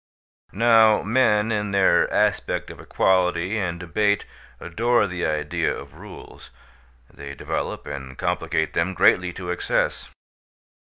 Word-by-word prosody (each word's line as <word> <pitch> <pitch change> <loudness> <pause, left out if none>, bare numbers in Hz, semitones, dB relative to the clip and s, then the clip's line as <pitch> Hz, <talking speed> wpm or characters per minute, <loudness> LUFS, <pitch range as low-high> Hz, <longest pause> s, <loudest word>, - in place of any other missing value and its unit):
Now 110 0 +4
men 110 -1 +2
in 105 -1 -1
their 100 -1 +3
aspect - - 0
of - - -13
equality 90 +2 0
and 85 -3 -3
debate 100 +4 0 0.3
adore 115 +6 +1
the 90 -2 -3
idea 75 -1 -1
of - - -8
rules; - - -13 0.6
they 70 0 -9
develop - - -4
and 65 -2 -8
complicate 80 -1 -2
them 90 +3 -1
greatly 90 0 +3
to 90 -1 -6
excess. 90 - -2
95 Hz, 120 wpm, -23 LUFS, 85-105 Hz, 0.6 s, Now